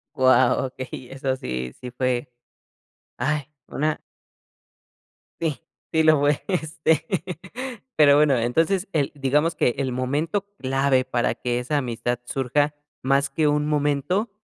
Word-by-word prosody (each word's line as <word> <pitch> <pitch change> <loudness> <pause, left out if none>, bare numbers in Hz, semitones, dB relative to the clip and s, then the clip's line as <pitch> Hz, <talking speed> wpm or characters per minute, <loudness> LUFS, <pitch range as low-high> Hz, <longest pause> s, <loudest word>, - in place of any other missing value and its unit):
Guau, 130 0 +4
okey, 130 -1 -8
eso 135 0 -1
sí 65 - -4
sí 125 - -7
fue. 125 0 -1 0.9
Ay, 145 +2 -1 0.2
una 155 +1 -1 1.4
Sí, 160 -4 -1 0.3
sí 160 0 +3
lo 155 -2 +5
fue, 145 0 +2
este 160 -3 0 0.9
Pero 145 -2 +7
bueno, 145 -3 +4
entonces, 165 - +1
el 145 -4 +1
digamos 145 +4 +1
que 120 - +2
el 135 -2 -1
momento 145 +10 -1
clave 135 -2 +2
para 120 -2 0
que 120 -1 -1
esa 130 +5 -1
amistad 120 -2 -2
surja 140 +4 0 0.3
más 135 +1 +2
que 150 +2 +1
un 150 0 +2
momento, 150 - 0
140 Hz, 130 wpm, -24 LUFS, 130-150 Hz, 1.4 s, Pero